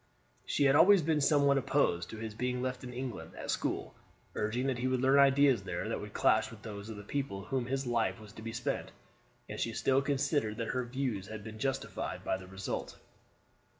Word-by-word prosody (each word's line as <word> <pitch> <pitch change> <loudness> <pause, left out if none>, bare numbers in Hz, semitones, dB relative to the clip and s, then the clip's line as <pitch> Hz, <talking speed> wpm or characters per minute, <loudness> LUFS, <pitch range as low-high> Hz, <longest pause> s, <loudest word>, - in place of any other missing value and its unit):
She 145 - +1
had 135 0 +5
always 190 +3 +7
been 155 -1 +2
somewhat 140 -1 +4
opposed 90 -11 +1
to 110 - -7
his 110 0 -5
being 125 +3 -2
left 130 0 -3
in 125 - -6
England 125 -1 -6
at - - -4
school, - - -2 0.4
urging 115 +5 -1
that 130 -3 0
he 130 - 0
would 130 -1 +1
learn 135 +2 +5
ideas 140 -3 +5
there 90 +1 -4
that 115 - -2
would 105 0 -9
clash 110 0 +3
with 115 -2 -13
those 105 -1 -7
of 110 - -6
the 105 - -8
people 135 -2 -3
among 95 +2 -9
whom 130 -3 0
his 135 +1 -1
life 115 -2 0
was 105 -1 -12
to 110 - -10
be 115 +1 -5
spent; 120 +1 -2 0.6
and - - -6
she 115 - -1
still 135 +4 +2
considered 135 -5 0
that 115 - -3
her 125 -1 -1
views 120 -6 -2
had 110 -1 -7
been 110 0 -8
justified 135 +2 -3
by - - 0
the 95 -1 -8
result. 95 +1 -5
125 Hz, 220 wpm, -32 LUFS, 110-135 Hz, 0.6 s, always